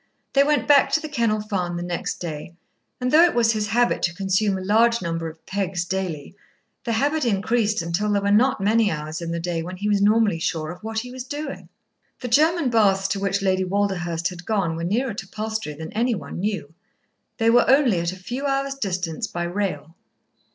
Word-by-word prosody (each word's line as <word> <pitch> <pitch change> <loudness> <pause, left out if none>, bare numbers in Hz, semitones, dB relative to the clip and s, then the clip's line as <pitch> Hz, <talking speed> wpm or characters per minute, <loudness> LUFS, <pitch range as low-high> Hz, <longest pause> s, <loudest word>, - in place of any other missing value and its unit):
They 275 - +5
went 295 0 +1
back 285 -2 +5
to - - +4
The 310 - -6
Kennel 230 -7 0
Farm 185 -5 -2
the 175 - -4
next 175 -1 -3
day, 160 0 -6 0.4
and 250 0 -1
though 315 - +7
it 345 - +3
was 230 -1 +4
his 215 -2 -1
habit 240 +2 +2
to 175 0 0
consume 195 +1 +1
a - - -5
large 230 +4 +3
number 165 -1 -3
of 160 0 -16
"pegs" 190 -3 -2
daily, 180 -5 -4 0.5
the 230 - 0
habit 290 +6 +1
increased 215 -2 +1
until 180 +6 -1
there 200 -1 +2
were 200 - +1
not 245 +5 +3
many 215 +2 +3
hours 155 -1 -4
in 170 - -4
the 170 0 -2
day 170 -1 -2
when 180 +2 -7
he 205 +3 -3
was 205 -1 +2
normally 210 -4 +3
sure 160 -1 -2
of 180 - -11
what 220 0 -5
he 250 +1 -9
was 255 -1 -6
doing. 290 +2 -6 0.5
The 250 - -5
German 310 +2 +3
baths 195 -4 +3
to 195 - -1
which 195 0 -1
Lady 190 -1 +2
Walderhurst 180 -3 -1
had 180 -1 -9
gone 190 -5 0
were 165 - -4
nearer 230 +7 0
to 195 -1 -7
Palstrey 215 -7 -4
than 160 +4 -8
any 235 +2 +1
one 180 - -7
knew. 185 -6 -3 0.6
They 225 0 +3
were 240 +1 +5
only 260 -9 +4
at 170 0 -1
a - - -8
few 245 +10 -4
hours' 275 0 0
distance 185 -5 -3
by 175 - -4
rail. 175 -4 -3
200 Hz, 215 wpm, -23 LUFS, 175-235 Hz, 0.6 s, though